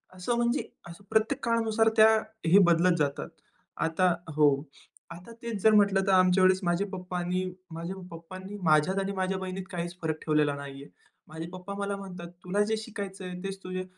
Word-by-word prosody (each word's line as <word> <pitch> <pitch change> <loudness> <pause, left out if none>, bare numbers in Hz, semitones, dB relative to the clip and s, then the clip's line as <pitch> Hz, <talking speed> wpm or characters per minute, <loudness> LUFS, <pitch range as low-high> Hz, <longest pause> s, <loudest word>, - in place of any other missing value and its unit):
असं 185 +7 -1
म्हणजे, 240 +3 +1 0.2
असं 170 +4 -12
प्रत्येक 220 +6 +1
काळानुसार 225 -1 +2
त्या 220 0 +9 0.4
हे 195 +4 +7
बदलत 170 +1 +4
जातात. 140 -1 -1 0.5
आता 175 +2 +2 0.2
हो. 150 -2 +5 0.6
आता 175 +7 -10
तेच 230 -4 -4
जर 220 - +6
म्हटलं 200 -2 +4
तर - - +4
आमच्या 185 0 +5
वेळी, 185 0 +6
माझे 175 +3 +1
पप्पांनी 180 -1 -2 0.3
माझ्या 170 +3 -5 0.2
पप्पांनी 185 +4 -9
माझ्यात 160 +5 +3
आणि 195 0 -2
माझ्या 190 0 -1
बहिणीत 190 0 -5
काहीच 175 0 -4
फरक 160 -1 -1
ठेवलेला 150 -2 +2
नाही 140 -1 -8
आहे. - - -14 0.4
माझे 160 +1 -7
पप्पा 185 +2 -7
मला 200 0 -2
म्हणतात 180 -3 -8 0.2
"तुला 190 +3 0
जे 220 0 0
शिकायचं 200 -4 -6
आहे 180 0 -6
तेच 195 0 -4
तुझे 185 0 -4
185 Hz, 175 wpm, -28 LUFS, 170-200 Hz, 0.6 s, त्या